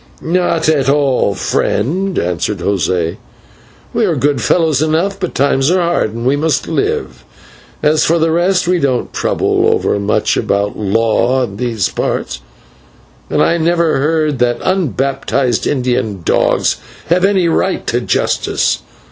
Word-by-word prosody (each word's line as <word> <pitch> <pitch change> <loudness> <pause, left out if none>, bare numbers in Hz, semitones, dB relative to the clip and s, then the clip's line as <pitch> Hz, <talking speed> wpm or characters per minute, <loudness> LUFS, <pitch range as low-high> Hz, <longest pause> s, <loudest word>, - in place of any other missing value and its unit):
"Not 170 -1 0
at 140 -4 +2
all, 135 -8 +2
friend," 180 - -1
answered 90 +4 -1
José, 90 -2 -1 0.8
"we - - +1
are - - +1
good 145 -1 0
fellows 160 -5 +2
enough, 165 +6 0
but 180 -3 -4
times 135 0 +2
are 185 +1 +2
hard 170 -10 0
and 115 +1 -5
we 135 +2 +3
must 150 0 0
live. 65 -2 -2 0.6
As 155 +1 +3
for 170 - +2
the 165 0 +1
rest, 180 +2 +1
we 180 0 +2
don't 130 -5 -1
trouble - - +1
over - - 0
much 100 +1 0
about 100 +1 -1
law 115 +5 +1
in 100 -5 -5
these 115 -5 -1
parts, - - -3 0.9
and - - +2
I 170 - +2
never 165 -2 +1
heard 155 -1 0
that 120 -1 +1
unbaptised 135 - 0
Indian 125 -8 -1
dogs - - +1 0.3
have 180 +2 +2
any 195 -3 +3
right 165 - 0
to - - 0
justice. - - 0
140 Hz, 145 wpm, -15 LUFS, 115-170 Hz, 0.9 s, we